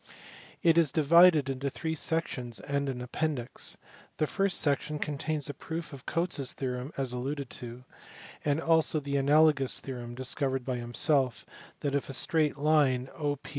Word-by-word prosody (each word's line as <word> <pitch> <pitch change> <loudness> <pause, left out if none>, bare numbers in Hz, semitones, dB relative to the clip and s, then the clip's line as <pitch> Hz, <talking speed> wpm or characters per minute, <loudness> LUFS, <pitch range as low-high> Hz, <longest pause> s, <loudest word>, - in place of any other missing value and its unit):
It 170 -1 +5
is 160 -5 +3
divided 160 -1 +6
into 135 +1 -2
three 160 +4 -4
sections 135 -7 -2
and 140 0 -2
an 125 -2 -4
appendix. 130 -1 -1 0.4
The 155 - +2
first 195 +3 +1
section 150 +1 0
contains 150 +1 -3
a 145 - -4
proof 160 +3 -6
of 135 -1 -11
Cotes 170 -2 -1
s 135 -2 -1
theorem 125 0 -4
above 135 -3 -1
alluded 135 +2 -4
to; 120 +1 -6 0.6
and 145 +1 +1
also 165 -1 +2
the 140 -1 -2
analogous 145 -1 +3
theorem 120 -3 -7
(discovered 130 0 -1
by 130 -2 -2
himself) 125 +2 +1 0.4
that, 140 -1 -1
if 140 -1 -1
a - - -4
straight 150 +2 +2
line 140 -4 +2
OP^^... 145 -2 -1
140 Hz, 160 wpm, -29 LUFS, 130-155 Hz, 0.6 s, divided